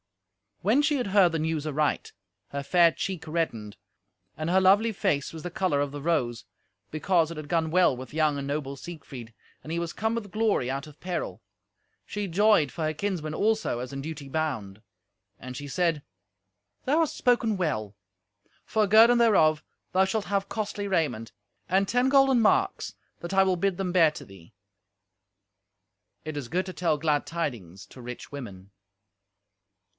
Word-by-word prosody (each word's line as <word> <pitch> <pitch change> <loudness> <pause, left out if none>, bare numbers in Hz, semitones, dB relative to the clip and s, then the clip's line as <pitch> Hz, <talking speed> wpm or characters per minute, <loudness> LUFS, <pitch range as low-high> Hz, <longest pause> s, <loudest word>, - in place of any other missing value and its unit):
When 230 - +3
she 295 -1 +2
had 245 - -2
heard 195 -3 +4
the 165 - -1
news 155 -1 -1
aright, 150 -1 -1 0.4
her 140 - -4
fair 170 +4 +4
cheek 180 0 -5
reddened, 115 -11 -3 0.6
and 155 +2 -3
her 190 +2 +4
lovely 205 +5 +4
face 145 -8 -1
was 160 - -7
the 180 - -6
colour 170 -5 0
of 145 -1 -1
the 145 0 -7
rose, 135 -8 -1 0.5
because 165 +1 +1
it 165 - -7
had 155 -1 -7
gone 160 0 0
well 180 -6 +4
with 130 +3 -9
young 155 -2 +1
and 140 0 -4
noble 140 -1 -3
Siegfried, 135 -7 -10 0.3
and 155 - -8
he 170 - -1
was 170 -1 -4
come 220 +1 -1
with 215 -4 -4
glory 215 - +1
out 135 +2 -3
of 150 -1 -15
peril. 180 -1 -4 0.6
She 205 -1 -4
joyed 190 -4 +3
for 165 - -4
her 155 0 0
kinsmen 160 -3 -3
also, 215 - 0
as 125 0 -6
in 135 - -4
duty 150 -1 -7
bound. 110 -10 -3 0.6
And 130 -1 -8
she 145 - -7
said, 160 +1 0 0.8
"Thou 295 +5 +2
hast 325 -3 +1
spoken 240 -4 +2
well; 110 - -2 0.7
for 215 -2 +1
guerdon 225 +4 +7
thereof 155 -10 +4 0.3
thou 190 +1 +4
shalt 205 +2 -2
have 200 -1 -1
costly 205 -2 -3
raiment, 150 - -1 0.4
and 190 +2 +2
ten 245 +4 +2
golden 270 -2 +5
marks, 220 - +1 0.3
that 170 +2 -6
I 195 - +6
will 190 -1 +2
bid 185 +1 0
them 190 -2 -2
bear 170 -3 +5
to - - -10
thee." 95 -4 -16 1.7
It 155 -1 -5
is 140 -4 -4
good 180 +8 -1
to 185 - -6
tell 165 -4 0
glad 150 -1 0
tidings 110 - -5
to 130 - -13
rich 125 0 -8
women. 100 -9 -9
165 Hz, 175 wpm, -27 LUFS, 140-195 Hz, 1.7 s, guerdon